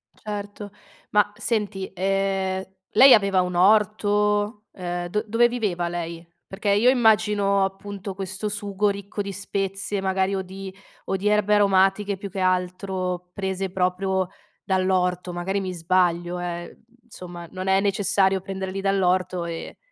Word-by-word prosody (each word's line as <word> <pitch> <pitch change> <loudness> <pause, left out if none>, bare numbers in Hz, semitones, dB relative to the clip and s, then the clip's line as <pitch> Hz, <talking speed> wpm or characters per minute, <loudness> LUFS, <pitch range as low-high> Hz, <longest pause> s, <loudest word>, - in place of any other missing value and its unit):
Certo. 205 -1 -7 0.4
Ma 205 0 +3
senti, 205 -5 -2
ehm, 190 0 0 0.3
lei 270 0 +8
aveva 200 -3 +4
un 180 -1 -3
orto, 210 +1 +2
ehm, 175 -1 -4
do 210 +4 -1
dove 230 +3 +4
viveva 205 -8 -1
lei? 170 -1 -5 0.2
Perché 200 +2 -3
io 210 +5 +5
immagino, 210 -5 +3
appunto, 195 0 -5
questo 195 +2 -4
sugo 205 0 -1
ricco 200 +1 -4
di 200 0 -4
spezie, 195 0 -3
magari 190 0 0
o 190 - -1
di 190 +1 -8 0.3
o 195 - -1
di 200 +2 -2
erbe 210 0 +3
aromatiche 195 0 +3
più 200 +1 -7
che 195 - -6
altro 185 0 -1
prese 190 -1 -3
proprio 185 0 0 0.4
dall'orto, 185 -2 0
magari 190 +3 -2
mi 185 -1 -4
sbaglio 175 0 +1
eh, 175 -1 -4
uhm, - - -23 0.3
insomma, 175 -3 -9
non 185 0 -5
è 190 0 +4
necessario 195 -1 +2
prenderli 190 0 -4
dall'orto 185 -2 +1
e 165 -1 -6
195 Hz, 140 wpm, -24 LUFS, 185-205 Hz, 0.4 s, lei